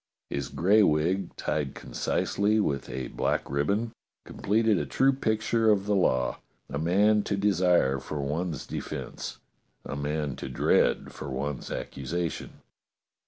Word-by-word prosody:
His 70 -2 -2
gray 100 +6 +4
wig, 90 +2 +1
tied 75 -3 -2
concisely 100 - 0
with 70 -9 -1
a 65 -1 -4
black - - -1
ribbon, 100 - 0 0.3
completed 110 -1 +1
a 75 - -2
true 135 - +3
picture 110 -2 +1
of 100 -2 +3
the 105 - +1
law: 65 -10 +2 0.3
a 70 - -2
man 100 +6 +4
to 100 - -1
desire 90 -9 +3
for 75 +3 -5
one's 75 +2 -2
de - - -4
fence, - - -6 0.5
a - - -4
man 75 -1 -2
to 65 - -6
dread 65 - +2
for - - -7
one's 70 0 -3
accusation. 85 +6 -4
85 Hz, 140 wpm, -28 LUFS, 70-105 Hz, 0.5 s, gray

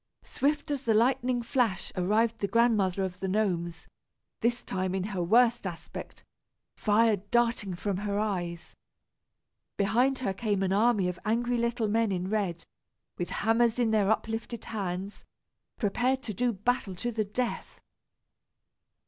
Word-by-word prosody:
Swift 290 +1 -1
as 280 -3 -1
the 225 -5 +2
lightning 245 +1 +2
flash 230 -5 0
arrived 220 +5 +1
the 200 - 0
Grandmother 200 -4 +2
of 185 -1 -4
the 190 - -2
Gnomes, 175 -5 -1 0.5
this 240 +1 0
time 185 -1 -2
in 190 - -1
her 195 -2 -3
worst 230 +4 +3
aspect, 170 -3 -8 0.5
fire 215 0 +3
darting 235 -5 +1
from 195 +1 -2
her 200 0 -2
eyes. 175 -5 -3 1.0
Behind 240 +7 +2
her 250 -7 -1
came 205 -2 -1
an 190 0 +1
army 210 -2 +3
of 180 -1 -4
angry 240 +2 0
little 235 -1 0
men 225 0 +1
in 185 +1 -2
red, 190 -6 -1 0.5
with 175 - -2
hammers 225 +1 +2
in 235 -3 +2
their 210 -2 +3
uplifted 225 +1 -2
hands, 195 -1 -4 0.5
prepared 250 +5 0
to 220 - -4
do 245 +4 +1
battle 210 -1 -1
to 240 +7 -3
the 220 -1 0
death. 240 +4 -3
215 Hz, 145 wpm, -29 LUFS, 190-235 Hz, 1.0 s, worst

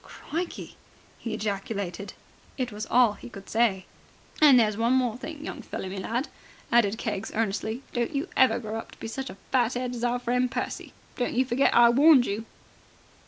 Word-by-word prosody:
"Crikey!" 335 +3 -6 0.4
he 230 - -5
ejaculated. 200 -2 -4 0.4
It 250 -3 -2
was 210 +1 -6
all 245 -2 +5
that 205 - -16
he - - -10
could 200 -4 -11
say. 220 -5 +1 0.6
"And 280 -5 +8
there's 215 -2 +2
one 230 +3 +2
more 250 -4 +2
thing, 300 +3 -8
young - - -6
feller 190 - -6
me 195 - -6
lad," 235 +8 -2 0.4
added 225 -3 +3
Keggs 205 -4 -3
earnestly, 220 +3 -2
"don't 240 +2 -1
you 285 +6 -1
ever 260 -4 +5
grow 220 -1 -4
up - - -9
to - - -17
be - - -6
such 265 +4 -5
a - - -10 0.2
fat'ead 250 0 +1
as 240 -1 -5
our 245 0 +1
friend 250 +1 0
Percy. - - -4 0.2
Don't 250 +1 +1
forget 255 +2 +2
I 235 0 +8
warned 275 +1 +6
you." 215 +2 -3
235 Hz, 185 wpm, -27 LUFS, 215-255 Hz, 0.6 s, And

